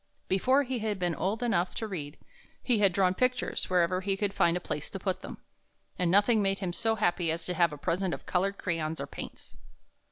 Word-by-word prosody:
Before 255 Hz, +9 st, +3 dB
he 255 Hz, -2 st, -3 dB
had 215 Hz, -2 st, -1 dB
been 175 Hz, -2 st, 0 dB
old 205 Hz, +8 st, -1 dB
enough 180 Hz, -7 st, +1 dB
to 225 Hz, -, -3 dB
read, 160 Hz, -8 st, -5 dB, 0.5 s
he 240 Hz, -4 st, +2 dB
had 200 Hz, -2 st, +5 dB
drawn 185 Hz, 0 st, +3 dB
pictures 250 Hz, +4 st, 0 dB
wherever 185 Hz, 0 st, +2 dB
he 195 Hz, 0 st, -1 dB
could 200 Hz, -1 st, -1 dB
find 170 Hz, +1 st, +3 dB
a -, -, -2 dB
place 150 Hz, -3 st, -4 dB
to -, -, -5 dB
put 190 Hz, -1 st, -2 dB
them, -, -, -8 dB, 0.6 s
and 180 Hz, -2 st, +2 dB
nothing 205 Hz, +4 st, +4 dB
made 195 Hz, -1 st, +1 dB
him 185 Hz, -3 st, -3 dB
so 225 Hz, +4 st, +1 dB
happy 175 Hz, -5 st, +1 dB
as 165 Hz, +1 st, -3 dB
to 180 Hz, -, -2 dB
have 170 Hz, -3 st, +3 dB
a 150 Hz, -, -7 dB
present 180 Hz, +5 st, -1 dB
of -, -, -5 dB
colored 195 Hz, +2 st, 0 dB
crayons 165 Hz, -3 st, -2 dB
or -, -, -3 dB
paints. -, -, -9 dB
185 Hz, 220 wpm, -29 LUFS, 175-210 Hz, 0.6 s, had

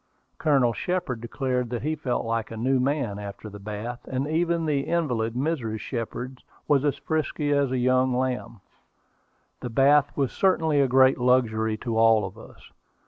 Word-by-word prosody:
Colonel 135 Hz, -6 st, +3 dB
Shepard 165 Hz, -, -2 dB
declared 125 Hz, 0 st, -2 dB
that 120 Hz, 0 st, -4 dB
he 155 Hz, +2 st, 0 dB
felt 135 Hz, -7 st, -2 dB
like 115 Hz, -1 st, -2 dB
a 115 Hz, -, -7 dB
new 130 Hz, +3 st, +1 dB
man 130 Hz, -6 st, -1 dB
after 100 Hz, +1 st, -8 dB
the 105 Hz, 0 st, -10 dB
bath, 105 Hz, +4 st, -6 dB
and 130 Hz, +1 st, -2 dB
even 165 Hz, +1 st, 0 dB
the 150 Hz, -3 st, +1 dB
invalid 125 Hz, -10 st, 0 dB
Mrs. 125 Hz, -6 st, -2 dB
Shepard 125 Hz, +3 st, -5 dB, 0.3 s
was 145 Hz, -2 st, +3 dB
as 145 Hz, -1 st, +1 dB
frisky 150 Hz, 0 st, -2 dB
as 140 Hz, -2 st, +2 dB
a 130 Hz, -, -1 dB
young 130 Hz, +1 st, +2 dB
lamb. 125 Hz, -4 st, -2 dB, 1.0 s
The 125 Hz, -, -5 dB
bath 140 Hz, +4 st, +3 dB
was 135 Hz, -3 st, +1 dB
certainly 160 Hz, -6 st, +2 dB
a 135 Hz, -, +3 dB
great 130 Hz, +1 st, +4 dB
luxury 110 Hz, -3 st, +2 dB
to 115 Hz, -1 st, -2 dB
all 115 Hz, -2 st, +5 dB
of 95 Hz, -, -8 dB
us. -, -, -15 dB
130 Hz, 170 wpm, -25 LUFS, 115-145 Hz, 1.0 s, all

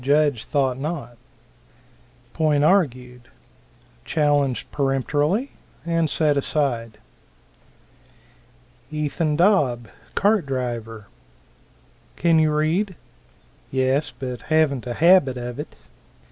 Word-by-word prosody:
Judge 140 Hz, -3 st, +2 dB
thought 135 Hz, -3 st, 0 dB
not. 145 Hz, -5 st, -5 dB, 1.2 s
Point 150 Hz, -3 st, +2 dB
argued. 125 Hz, -9 st, +1 dB, 0.8 s
Challenged 145 Hz, -2 st, 0 dB
peremptorily, 145 Hz, -, 0 dB, 0.3 s
and 165 Hz, -2 st, 0 dB
set 150 Hz, -1 st, +1 dB
aside. 125 Hz, -6 st, -1 dB, 1.9 s
Ethan 150 Hz, 0 st, -1 dB
Dobb, 145 Hz, -, +2 dB, 0.3 s
cart 205 Hz, -6 st, +2 dB
driver. 120 Hz, -5 st, -4 dB, 1.1 s
"Can 165 Hz, -1 st, +3 dB
you 155 Hz, -1 st, +3 dB
read?" 165 Hz, +6 st, 0 dB, 0.7 s
"Yes, 130 Hz, +3 st, 0 dB
but 125 Hz, -2 st, -5 dB
haven't 150 Hz, -5 st, +2 dB
a 120 Hz, -, -3 dB
habit 165 Hz, -6 st, +4 dB
of 120 Hz, +1 st, -6 dB
it." 150 Hz, -, -7 dB
145 Hz, 90 wpm, -22 LUFS, 125-155 Hz, 1.9 s, habit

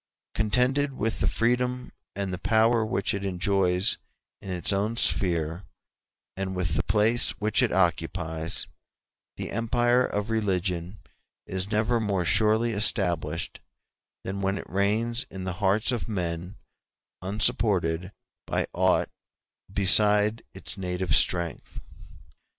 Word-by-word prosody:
Contented 125 Hz, +6 st, +1 dB
with 115 Hz, -3 st, -2 dB
the -, -, 0 dB
freedom 125 Hz, +2 st, 0 dB, 0.2 s
and 100 Hz, -1 st, -3 dB
the 90 Hz, -, -4 dB
power 115 Hz, +3 st, +3 dB
which 100 Hz, -2 st, -1 dB
it 100 Hz, 0 st, -3 dB
enjoys 95 Hz, 0 st, +1 dB, 0.4 s
in 100 Hz, -, -9 dB
its 90 Hz, +1 st, +1 dB
own 105 Hz, +4 st, -1 dB
sphere, 85 Hz, -4 st, +1 dB, 0.7 s
and 95 Hz, 0 st, -4 dB
with 90 Hz, -3 st, -2 dB
the -, -, +1 dB
place 110 Hz, +4 st, +2 dB
which 105 Hz, +4 st, +1 dB
it 125 Hz, -, +2 dB
occupies, 85 Hz, -2 st, -1 dB, 0.7 s
the -, -, -5 dB
empire 120 Hz, +3 st, +2 dB
of 105 Hz, -1 st, -3 dB
religion 95 Hz, -4 st, -1 dB, 0.5 s
is 95 Hz, +1 st, -4 dB
never 110 Hz, +2 st, +1 dB
more 100 Hz, -5 st, -1 dB
surely 110 Hz, +4 st, +3 dB
established 85 Hz, -7 st, 0 dB, 0.6 s
than 100 Hz, +1 st, -4 dB
when 95 Hz, +1 st, 0 dB
it -, -, -8 dB
reigns 110 Hz, +5 st, 0 dB
in 95 Hz, -1 st, -7 dB
the 95 Hz, -1 st, -3 dB
hearts 105 Hz, +5 st, +3 dB
of 120 Hz, -, -3 dB
men 90 Hz, -2 st, -4 dB, 0.7 s
unsupported 95 Hz, -3 st, +1 dB, 0.4 s
by -, -, 0 dB
aught -, -, +2 dB, 0.6 s
beside 105 Hz, +2 st, +4 dB
its 95 Hz, +1 st, -4 dB
native 90 Hz, -3 st, -1 dB
strength. 85 Hz, -3 st, -1 dB
100 Hz, 120 wpm, -26 LUFS, 90-110 Hz, 0.7 s, beside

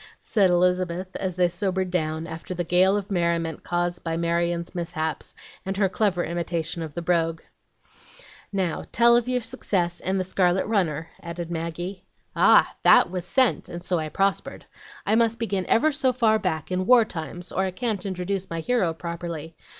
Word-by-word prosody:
said 200 Hz, -4 st, +2 dB
Elizabeth, 180 Hz, +1 st, +1 dB
as 185 Hz, -2 st, -3 dB
they 180 Hz, -1 st, +3 dB
sobered 190 Hz, 0 st, -2 dB
down 160 Hz, -2 st, -1 dB
after 165 Hz, +2 st, -7 dB
the 175 Hz, -, -1 dB
gale 185 Hz, +4 st, +3 dB
of 205 Hz, 0 st, -5 dB
merriment 170 Hz, -3 st, 0 dB
caused 175 Hz, 0 st, -2 dB
by 165 Hz, -1 st, -2 dB
Marion's 170 Hz, 0 st, -1 dB
mishaps, 160 Hz, -4 st, -3 dB, 0.3 s
and 195 Hz, 0 st, -3 dB
her 200 Hz, -1 st, +3 dB
clever 190 Hz, -2 st, 0 dB
imitation 170 Hz, -1 st, -3 dB
of 155 Hz, -3 st, -6 dB
the 170 Hz, -, -4 dB
brogue. 165 Hz, -1 st, 0 dB, 1.1 s
"Now 185 Hz, -5 st, -1 dB
tell 235 Hz, 0 st, +5 dB
of 240 Hz, +1 st, +1 dB
your 250 Hz, -1 st, +1 dB
success, 195 Hz, -7 st, -1 dB
and 190 Hz, +1 st, -1 dB
the -, -, 0 dB
scarlet 185 Hz, 0 st, +1 dB
runner," 165 Hz, -7 st, 0 dB
added 170 Hz, 0 st, -6 dB
Maggie. 175 Hz, +3 st, -4 dB, 0.3 s
"Ah! -, -, +5 dB
that -, -, +6 dB
was 180 Hz, -2 st, -3 dB
SENT, 260 Hz, +5 st, +2 dB
and 175 Hz, 0 st, -7 dB
so 180 Hz, -1 st, 0 dB
I 155 Hz, -1 st, -3 dB
prospered. 195 Hz, +4 st, -1 dB, 0.4 s
I 210 Hz, -, +1 dB
must 230 Hz, 0 st, +3 dB
begin 200 Hz, -6 st, -2 dB
ever 310 Hz, +7 st, +3 dB
so 275 Hz, -3 st, +1 dB
far 225 Hz, -3 st, +2 dB
back, 160 Hz, -5 st, -2 dB
in 185 Hz, +1 st, -1 dB
war 245 Hz, -3 st, +7 dB
times, 175 Hz, -1 st, -7 dB
or 190 Hz, -, 0 dB
I -, -, -1 dB
can't 210 Hz, +1 st, -3 dB
introduce 190 Hz, 0 st, -3 dB
my 165 Hz, -, -3 dB
hero 180 Hz, -3 st, 0 dB
properly. 170 Hz, -2 st, -6 dB
180 Hz, 175 wpm, -25 LUFS, 170-195 Hz, 1.1 s, war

